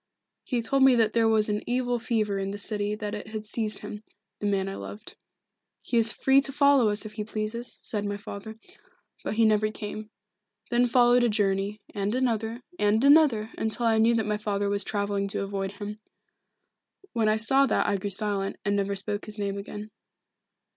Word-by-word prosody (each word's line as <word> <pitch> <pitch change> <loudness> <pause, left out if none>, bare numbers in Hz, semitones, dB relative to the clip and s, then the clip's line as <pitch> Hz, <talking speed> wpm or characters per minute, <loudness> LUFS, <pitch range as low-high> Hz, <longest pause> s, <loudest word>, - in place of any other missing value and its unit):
He 240 -2 -2
told 275 +4 +1
me 265 -1 +7
that 225 -2 +2
there 230 -1 +3
was 220 -1 +3
an 210 0 -1
evil 245 -1 0
fever 215 -4 -1
in 195 0 -2
the 200 - -5
city 205 0 -1
and 210 - -7
that 210 -1 -3
it 210 0 -6
had 215 -1 -6
seized 215 0 -2
him 210 0 -8 0.4
the 205 - -2
man 195 -1 0
I 195 - -4
loved. 210 +2 -9 0.7
'He - - -3
is 225 -1 +4
free 270 +4 +4
to 275 - -3
follow 280 -4 +4
us 210 +1 +1
if 215 - -7
he 215 - -4
pleases,' 220 +3 -5
said 210 -2 -3
my 205 0 -3
father. 215 +1 -8 0.7
But - - -3
he 225 0 +4
never 215 0 +3
came. 215 0 -7 0.6
Then 245 +1 +3
followed 245 0 +4
a 240 - +3
journey, 205 0 0
and 205 +2 -1
another, 230 -1 -1 0.2
and 210 +3 +2
another, 280 -7 +5
until 220 +2 -1
I 225 -1 +3
knew 230 +1 +4
that 220 -2 0
my 210 0 0
father 205 -1 -1
was 200 0 0
travelling 200 -1 -1
to 200 - -2
avoid 195 -1 -3
him. 210 +1 -7 1.1
When 225 -3 +2
I 215 - +2
saw 270 +5 +4
that - - +1
I 205 - +1
grew 200 +2 -4
silent, 200 0 -1
and 200 0 +1
never 200 0 0
spoke 205 +1 -4
his 215 0 -6
name 200 -1 -2
again. 210 +1 -8
215 Hz, 200 wpm, -27 LUFS, 205-230 Hz, 1.1 s, me